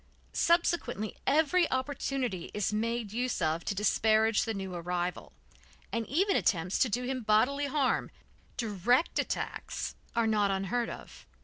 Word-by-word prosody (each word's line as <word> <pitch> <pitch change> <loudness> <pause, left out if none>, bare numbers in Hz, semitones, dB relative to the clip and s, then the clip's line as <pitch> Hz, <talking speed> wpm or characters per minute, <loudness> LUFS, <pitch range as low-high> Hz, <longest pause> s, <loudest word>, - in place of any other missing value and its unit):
Subsequently 340 - +1
every 315 +5 +3
opportunity 260 -7 -2
is 210 0 0
made 225 -1 -1
use 245 +1 -1
of 160 -1 0
to 200 - -1
disparage 215 +2 +3
the 225 - -2
new 190 -2 -5
arrival, 175 +1 -3 0.6
and 230 -2 -2
even 385 - +2
attempts 180 -1 +1
to 255 - +3
do 245 +4 -1
him 255 0 -2
bodily 245 +7 +2
harm, 275 -2 +1 0.5
direct 230 - +1
attacks, - - -3 0.2
are 230 -1 +3
not 210 -2 +2
unheard 195 +5 -1
of. - - -10
225 Hz, 135 wpm, -30 LUFS, 200-260 Hz, 0.6 s, every